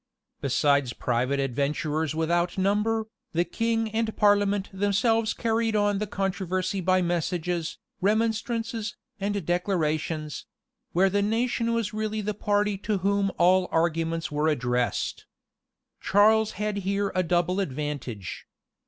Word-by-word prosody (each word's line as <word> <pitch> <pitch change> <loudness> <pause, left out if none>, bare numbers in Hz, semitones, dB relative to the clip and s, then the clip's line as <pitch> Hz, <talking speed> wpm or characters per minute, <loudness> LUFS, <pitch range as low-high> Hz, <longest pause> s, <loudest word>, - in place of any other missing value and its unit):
Besides 140 -2 +2
private 125 +4 0
adventurers 145 +4 -1
without 170 +3 0
number, 210 +3 +1 0.3
the 170 +1 +2
king 225 +1 0
and 220 0 -1
parliament 205 -1 +3
themselves 210 +3 +2
carried 225 -1 0
on 205 -1 +2
the 210 - -2
controversy 185 -1 -2
by 185 +1 +3
messages, 175 -1 -1 0.2
remonstrances, 225 +1 0 0.2
and 200 -2 -2
declarations; 160 -4 -1 0.5
where 190 +2 +3
the 205 +1 +2
nation 230 +2 0
was 230 -3 -1
really 215 0 -2
the 210 +1 -2
party 205 -1 0
to 205 0 -1
whom 200 -1 +2
all 185 +1 +4
arguments 165 0 0
were 150 +1 +1
addressed. 125 -5 -1 0.7
Charles 215 +2 +4
had 210 +1 -2
here 200 +1 -1
a 185 - +2
double 175 +1 +1
advantage. 140 - -4
195 Hz, 120 wpm, -26 LUFS, 160-210 Hz, 0.7 s, all